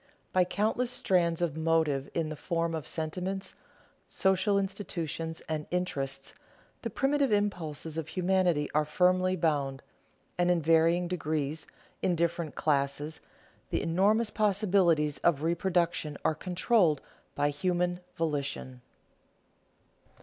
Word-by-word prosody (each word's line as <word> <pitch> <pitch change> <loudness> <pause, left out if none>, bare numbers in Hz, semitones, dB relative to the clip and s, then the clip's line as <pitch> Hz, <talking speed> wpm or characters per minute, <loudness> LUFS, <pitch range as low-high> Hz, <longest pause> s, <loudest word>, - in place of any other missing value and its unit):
By 185 -1 +4
countless 220 +6 0
strands 175 -7 +1
of 160 -4 -1
motive 160 -4 +1
in 165 -2 0
the 155 - -4
form 165 +1 -1
of 155 -6 -4
sentiments, 180 +7 -3 0.5
social 190 +1 +2
institutions, 170 -5 -3
and 155 -1 -3
interests, 135 -7 -3 0.5
the - - -3
primitive 275 -1 +1
impulses 165 -6 -1
of 160 - -5
humanity 180 -4 +1
are 150 +1 +3
firmly 185 +4 +2
bound; 145 -6 0 0.6
and 175 0 +3
in 175 -1 +3
varying 165 +2 +3
degrees, 155 -3 -2 0.3
in 180 - +2
different 170 -1 -1
classes, 145 +1 0 0.5
the - - -1
enormous 205 +6 +2
possibilities 190 -8 +2
of 155 -4 +2
reproduction 170 -3 0
are - - +3
controlled 180 - +2 0.4
by 145 +1 +1
human 175 +3 0 0.2
volition. 140 -5 -3
170 Hz, 115 wpm, -30 LUFS, 150-185 Hz, 0.6 s, By